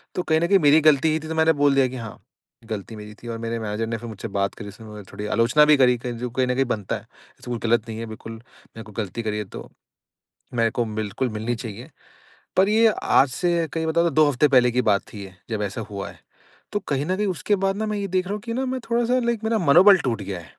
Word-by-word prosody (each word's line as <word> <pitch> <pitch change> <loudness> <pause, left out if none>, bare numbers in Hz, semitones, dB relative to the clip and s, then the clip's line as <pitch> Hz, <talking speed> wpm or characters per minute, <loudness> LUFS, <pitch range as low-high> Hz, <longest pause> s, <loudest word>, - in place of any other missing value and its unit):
तो 180 - -1
कहीं 160 -1 +2
न 170 - +1
कहीं 195 +2 +5
मेरी 150 0 +5
गलती 155 0 +4
ही 155 - 0
थी 160 - -9
तो 160 - -4
मैंने 160 0 +4
बोल 145 -1 +2
दिया 135 -1 +4
कि 130 - -8
हाँ, 115 -3 -8 0.5
गलती 110 +1 -5
मेरी 105 0 -10
थी - - -8
और 115 -1 -4
मेरे 115 0 -3
मैनेजर 110 +1 -3
ने 115 - -3
फ़िर 115 +1 -8
मुझसे 110 +1 -7
बात 100 -1 -1
करी 105 - -9
उसने 110 +2 -13
मतलब 105 -2 -10
थोड़ी 105 +1 -6
आलोचना 115 +8 +3
भी 150 -1 +5
करी, 125 -2 +4
कही 120 0 -5
जो 125 +1 -4
कहीं 130 +2 0
न 125 - 0
कहीं 135 +1 +2
बनता 105 -6 -2
है। - - -6
ऐसा - - -17
कुछ 120 - -2
गलत 115 -1 +2
नहीं 110 0 -5
है 115 - -4
बिल्कुल, 110 0 -9
मैंने 115 0 -14
कोई 105 0 -14
गलती 115 +5 -6
करी 105 -1 -2
है 105 - -3
तो, - - -10 0.8
मेरे 115 -1 +1
को 120 - -1
बिल्कुल 110 +4 -2
मिलनी 110 +2 -3
चाहिए। 115 +3 -8 0.7
पर 190 +1 +4
ये 220 +2 +4 0.2
आज 135 - +4
से 170 +4 0
कहीं 160 0 -2
बताऊँ 170 +1 +2
तो - - -2
2 155 0 +5
हफ़्ते 145 +1 +3
पहले 125 -2 +4
की 125 +1 +1
बात 100 -3 +2
थी 100 -2 -8
ये, 95 -1 -12 0.2
जब 110 -2 -2
ऐसा 100 +2 -3
हुआ 100 -1 -5
है। - - -14 0.5
तो 205 - -1
कहीं 140 0 -1
न 185 +3 0
कहीं 210 0 0
उसके 190 +3 0
बाद 195 0 +1
ना 220 - -1
मैं 210 -1 -2
ये 200 -1 -3
देख 185 0 0
रहा 200 - -3
हूँ 210 - -5
कि 230 +1 -5
ना 260 +3 -1
मैं 260 0 -2
थोड़ा-सा 240 +2 +2
लाइक 235 -2 -1
मेरा 220 0 +1
मनोबल 180 +5 +7
टूट 115 -5 -1
गया 95 -2 -5
है। 85 - -12
125 Hz, 275 wpm, -23 LUFS, 110-165 Hz, 0.8 s, मनोबल